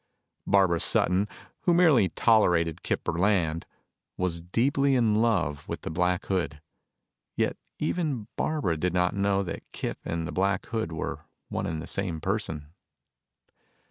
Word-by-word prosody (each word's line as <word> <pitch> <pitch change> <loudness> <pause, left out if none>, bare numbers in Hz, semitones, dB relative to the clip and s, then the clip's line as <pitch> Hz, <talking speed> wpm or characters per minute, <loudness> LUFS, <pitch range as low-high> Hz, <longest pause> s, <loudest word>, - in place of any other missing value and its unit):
Barbara 95 -4 +4
Sutton, 95 +5 +2 0.3
who 175 - +2
merely 150 - +5
tolerated 90 -8 +3
Kip - - -2
Burland, 85 -2 +1 0.5
was 85 -2 -1
deeply 135 +9 +2
in 115 -4 +3
love 90 -12 0
with - - -5
the - - -5
Black 90 +2 0
Hood, 85 -6 -1 0.8
yet - - +1 0.2
even 145 -12 -1
Barbara 145 - 0
did 90 +2 -1
not 90 0 +2
know 100 0 +1
that 85 -3 -5
Kip - - -4
and 80 0 -3
the - - -5
Black 95 0 0
Hood 110 -7 -3
were 80 - -4 0.2
one - - -2
and 80 -1 -3
the - - -6
same 90 -5 -2
person. 80 -5 -3
95 Hz, 140 wpm, -27 LUFS, 85-110 Hz, 0.8 s, merely